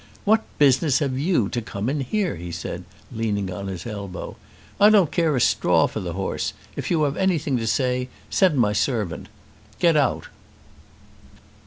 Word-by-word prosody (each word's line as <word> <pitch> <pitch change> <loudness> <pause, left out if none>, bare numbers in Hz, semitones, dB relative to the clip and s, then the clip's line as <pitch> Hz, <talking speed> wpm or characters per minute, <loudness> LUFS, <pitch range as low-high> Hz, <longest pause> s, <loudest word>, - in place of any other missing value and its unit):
"What 220 +2 +4 0.2
business 140 0 +4
have 130 -3 -1
you 150 - +2
to 120 - -2
come 105 -1 -5
in 145 +3 0
here?" 185 - -1
he 85 +1 -7
said, 85 +1 -6 0.3
leaning 105 -5 -2
on 100 +2 -6
his 90 -2 -6
elbow. 100 -5 -6 0.4
"I 205 - +8
don't 200 -7 +4
care 165 -4 +1
a - - +1
straw - - +3
for - - -4
the 85 -2 -4
horse. 95 +2 -2 0.2
If - - -4
you 165 -3 +2
have 140 -1 0
anything 165 -7 +1
to 115 -1 -3
say 125 +1 0 0.2
send 185 -7 +2
my 105 -4 +3
servant. 105 - -1 0.5
Get 170 -2 +3
out!" 145 -2 +1
125 Hz, 170 wpm, -23 LUFS, 100-155 Hz, 0.5 s, I